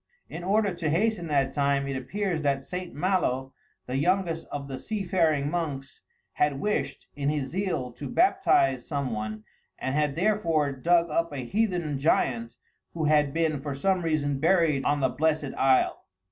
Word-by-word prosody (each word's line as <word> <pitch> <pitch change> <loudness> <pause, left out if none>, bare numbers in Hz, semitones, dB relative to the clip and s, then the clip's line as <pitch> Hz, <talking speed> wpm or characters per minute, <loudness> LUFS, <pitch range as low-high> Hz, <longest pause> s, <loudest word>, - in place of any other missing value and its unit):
In 170 - -7
order 200 +1 +2
to 165 -2 -2
hasten 180 +2 +1
that 140 -3 +1
time, 140 -1 +1
it 135 - -3
appears 175 +6 -2
that 140 -2 0
St. 180 -1 -5
Malo, 145 -6 0 0.3
the 130 - -2
youngest 175 +1 0
of 140 -1 -5
the 135 -1 -6
sea 215 +6 -3
faring 160 -6 +1
monks, 140 -7 -4 0.3
had 145 -2 +1
wished, 140 -8 -2
in 140 0 -1
his 145 -3 -2
zeal, 180 -9 -2
to 140 +4 -7
baptize 335 - +3
some 140 -4 -2
one, 110 0 -4 0.3
and 130 - -3
had 150 -1 +1
therefore 170 -6 +1
dug 170 +5 +2
up 165 +1 0
a 135 -4 -5
heathen 175 - -1
giant 120 -6 +1 0.4
who 165 - -2
had 150 -2 +3
been, 155 -2 0
for 140 -1 -4
some 185 +6 +1
reason, 145 -4 0
buried 160 -4 +3
on 145 0 +1
the 130 - +3
blessed 155 0 0
isle. 135 -1 +2
150 Hz, 170 wpm, -27 LUFS, 135-175 Hz, 0.4 s, baptize